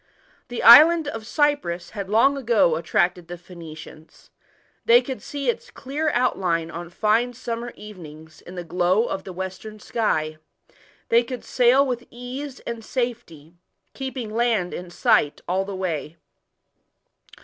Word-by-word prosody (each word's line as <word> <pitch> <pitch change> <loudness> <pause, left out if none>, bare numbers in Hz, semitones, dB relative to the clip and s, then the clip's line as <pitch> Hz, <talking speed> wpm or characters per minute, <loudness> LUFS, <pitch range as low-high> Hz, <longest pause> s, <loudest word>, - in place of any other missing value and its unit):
The 245 - -5
island 310 +6 +9
of 225 -5 -6
Cyprus 285 - 0
had 200 -2 -6
long 230 +7 +4
ago 230 - +2
attracted 175 +1 0
the 175 0 -7
Phoenicians 160 -3 -13 0.5
They 235 +1 +6
could 255 +1 -6
see 285 -1 -5
its 475 +1 -1
clear 300 - -3
outline 175 -9 0
on 170 +1 -7
fine 220 +6 +1
summer 235 -1 -5
evenings 160 -6 -12
in 180 - -11
the 175 - -5
glow 180 +6 +1
of 195 - -4
the 190 - -7
western 190 +4 -7
sky; 155 -10 -1 0.7
they 235 +1 +4
could 250 0 -7
sail 255 +2 +4
with 245 -2 -4
ease 255 +3 -7
and 235 -1 -6
safety, 225 - -4 0.4
keeping 260 -5 -5
land 225 -6 0
in 180 0 -7
sight 175 - +2
all 190 +2 0
the 200 0 -6
way. 170 -4 -4
215 Hz, 140 wpm, -23 LUFS, 175-245 Hz, 0.7 s, island